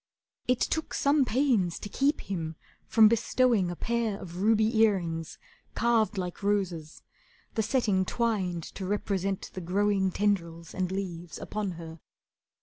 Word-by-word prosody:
It 250 -1 +2
took 320 - -1
some 280 -1 +3
pains 235 -9 +1
to - - -7
keep 280 +7 +1
him 165 -4 -4 0.3
from 220 -2 +7
bestowing 230 -3 +2
A 175 - -4
pair 230 -1 -1
of 175 -1 -8
ruby 220 +2 +3
earrings, 170 -7 +1 0.4
carved 225 -3 +2
like 180 -2 -4
roses, 185 -6 -1 0.5
The 220 - +1
setting 210 -5 +1
twined 190 -7 -1
to 190 +3 -6
represent 195 -1 -2
the 185 - -5
growing 195 +2 +1
Tendrils 170 -5 -1
and 185 -1 -1
leaves, 175 -4 -5
upon 205 -3 -3
her. 165 -1 -9
200 Hz, 140 wpm, -28 LUFS, 175-225 Hz, 0.5 s, from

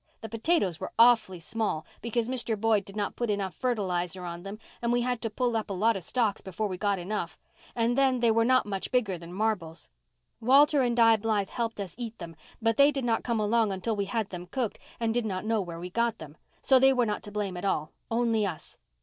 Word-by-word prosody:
The 225 - -6
potatoes 225 - 0
were - - -5
awful 225 -6 +5
small, 200 -3 -2 0.2
because 235 0 -1
Mr. 240 -4 -2
Boyd 220 -1 +2
did 195 - -11
not 205 -1 -2
put 240 -2 -2
enough 200 -3 -1
fertilizer 185 -7 -2
on 170 0 -6
them 195 +3 -7 0.2
and 235 0 0
we 245 0 +2
had 245 -1 -1
to 225 - -2
pull 240 +2 -1
up 220 -2 -2
a - - -2
lot 220 +4 +2
of 190 - -5
stalks 225 0 0
before 190 +3 -4
we 185 - -4
got 200 +1 0
enough, 180 -2 -4 0.4
and 235 +1 +1
then 265 -2 +3
they 235 -1 +4
were 225 +1 +3
not 255 +2 +3
much 195 -2 -4
bigger 215 -8 +1
than 170 +1 -10
marbles. 185 -5 -2 0.5
Walter 275 +4 +5
and 240 -2 +1
Di 225 -1 +6
Blythe 210 -2 0
helped 230 -3 -3
us 190 -4 -5
eat 230 -2 -5
them, 170 -2 -9 0.2
but 225 0 +1
they 280 +1 +7
did 275 -4 -2
not 230 -2 +1
come 235 -2 0
along 215 0 +2
until 195 +4 -2
we 200 -1 -1
had 215 0 -2
them 180 -1 -7
cooked 240 +2 -3 0.2
and 225 -1 0
did 240 0 0
not 195 -2 -3
know 220 -1 +1
where 170 -3 -6
we 180 +1 -7
got 235 +1 0
them, 150 -1 -11 0.3
so 265 -1 +6
they 270 +1 +6
were 250 -2 +2
not 210 -1 -2
to 205 - -10
blame 205 -3 -3
at 180 - -6
all, 155 -6 -1 0.2
only 230 -2 +1
us. 180 -6 -5
220 Hz, 235 wpm, -28 LUFS, 190-235 Hz, 0.5 s, they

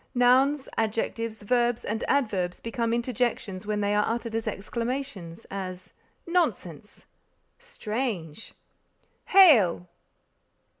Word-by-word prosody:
Nouns, 260 +3 +3
adjectives, 225 0 -2
verbs 240 +2 +1
and 220 +2 -3
adverbs 195 -10 0
become 230 0 -2
interjections 235 -5 -2
when 210 -1 -1
they 205 0 +1
are 210 0 +3
uttered 230 0 -3
as 225 0 -2
exclamations, 215 -4 -4
as, 185 -2 -6 0.3
_nonsense! 350 0 -2 0.5
strange! 225 - -5 0.7
hail! 230 - +6
230 Hz, 95 wpm, -26 LUFS, 205-250 Hz, 0.7 s, hail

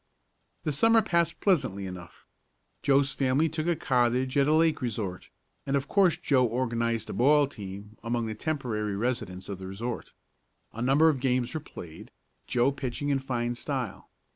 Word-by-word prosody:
The 155 - 0
Summer 225 +10 +4
passed 170 -1 0
pleasantly 130 - +1
enough. 90 -3 -9 0.6
Joe's 135 0 +3
family 135 +3 +2
took 155 +1 -3
a 170 - +2
cottage 130 -3 +1
at 140 0 +4
a - - +3
lake 160 -1 +3
resort, 105 -7 -4 0.3
and 140 - -1
of 140 0 -1
course 190 -1 +3
Joe 130 -3 +2
organized 115 -2 -1
a - - -5
ball 145 +4 +5
team 105 -4 -9
among 115 0 -1
the 110 - -3
temporary 110 -6 -2
residents 100 -5 -3
of 100 -2 -5
the 95 - -7
resort. 115 +5 -5 0.6
A 115 - -6
number 135 +6 +4
of 150 -4 +2
games 125 -1 0
were 160 - -2
played, 85 - -11 0.4
Joe 125 +3 +2
pitching 140 +1 -4
in 140 -1 +2
fine 120 -3 -2
style. 125 -3 -4
130 Hz, 165 wpm, -28 LUFS, 115-145 Hz, 0.6 s, ball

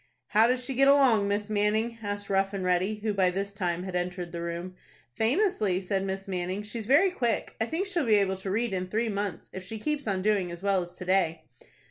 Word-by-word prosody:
"How 220 +2 +5
does 250 0 0
she 270 - -2
get 275 +2 +4
along, 260 -8 +5
Miss 205 +1 -1
Manning?" 215 +2 0
asked 205 -1 -4
Rough 195 0 +1
and 190 - -3
Ready, 180 +4 +1
who 215 -2 0
by 190 -2 +3
this 195 +2 -3
time 180 -3 -2
had 185 -1 -5
entered 180 -1 -3
the 170 0 -5
room. 170 +2 -4 0.4
"Famously," 220 - +1
said 190 +1 -1
Miss 195 0 -4
Manning. 185 +1 -3
"She's 215 +1 -6
very 310 +9 +5
quick. 240 - -1
I 225 - +1
think 335 +8 -1
she'll 350 -9 -1
be 215 - +5
able 195 -2 +2
to 190 +1 -6
read 220 +2 0
in 185 -1 -2
three 220 +4 -1
months, 200 -3 -4
if 190 - -6
she 220 +4 -6
keeps 290 +3 -2
on 190 -2 0
doing 200 -4 +1
as 170 +2 -9
well 195 -2 +2
as 175 0 -8
to 180 - -8
day." 180 -3 +1
200 Hz, 230 wpm, -28 LUFS, 185-225 Hz, 0.4 s, How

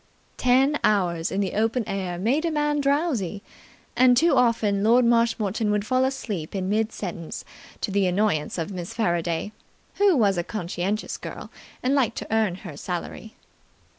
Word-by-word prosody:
Ten 265 +4 +3
hours 175 -5 +1
in 195 - 0
the 195 - -2
open 225 +3 +1
air 185 -3 -3
make 245 - +1
a 335 - +1
man 295 -1 0
drowsy, 275 - 0 0.5
and 250 -1 +5
too 330 +2 +4
often 225 -5 +2
Lord 235 +3 +5
Marshmoreton 230 -3 +1
would 210 0 0
fall 255 +2 +2
asleep 210 -11 -4
in 190 -1 -2
mid 220 +2 +1
sentence 170 -4 -6 0.4
to - - -2
the 195 -1 +2
annoyance 180 -5 0
of 165 +3 -3
Miss 180 -2 -6
Faraday, 175 -2 -1 0.5
who 400 -5 +4
was 200 -6 +3
a - - -1
conscientious 190 +2 -3
girl - - -8 0.3
and 255 +2 +2
liked 270 -6 +1
to - - -5
earn 220 -5 +2
her 160 -6 -7
salary. 180 +7 -6
215 Hz, 165 wpm, -24 LUFS, 185-250 Hz, 0.5 s, and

